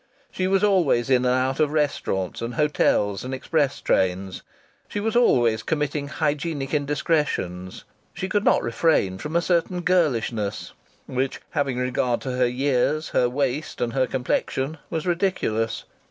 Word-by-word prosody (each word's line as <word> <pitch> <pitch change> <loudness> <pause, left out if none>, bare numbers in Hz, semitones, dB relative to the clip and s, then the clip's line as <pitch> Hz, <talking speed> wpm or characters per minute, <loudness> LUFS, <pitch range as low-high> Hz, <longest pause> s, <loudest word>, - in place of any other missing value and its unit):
She 185 - -1
was 195 +1 +2
always 165 - +3
in 125 -1 +4
and 125 0 +3
out 130 +2 0
of 150 -2 +2
restaurants 140 - -1
and 115 0 -4
hotels 105 -9 +1
and 130 +1 -4
express 140 0 0
trains. 95 0 0 0.5
She 205 - -4
was 220 +3 -1
always 120 - +4
committing 150 +1 -2
hygienic 150 -1 -2
indiscretions. 145 - -1 0.3
She 190 - -4
could 205 +2 0
not - - +3
refrain 115 - +1
from 150 +7 -5
a 170 - +3
certain 175 +1 0
girlishness 120 - 0 0.3
which, 130 +1 -2
having 135 -3 -1
regard 125 -1 0
to 130 - -4
her 125 0 +2
years, 140 +4 0
her 125 - +2
waist 140 +3 -2
and 120 -1 -1
her 130 -1 +2
complexion, 135 +3 -2
was 160 -2 -3
ridiculous. 170 - 0
135 Hz, 150 wpm, -24 LUFS, 120-160 Hz, 0.5 s, in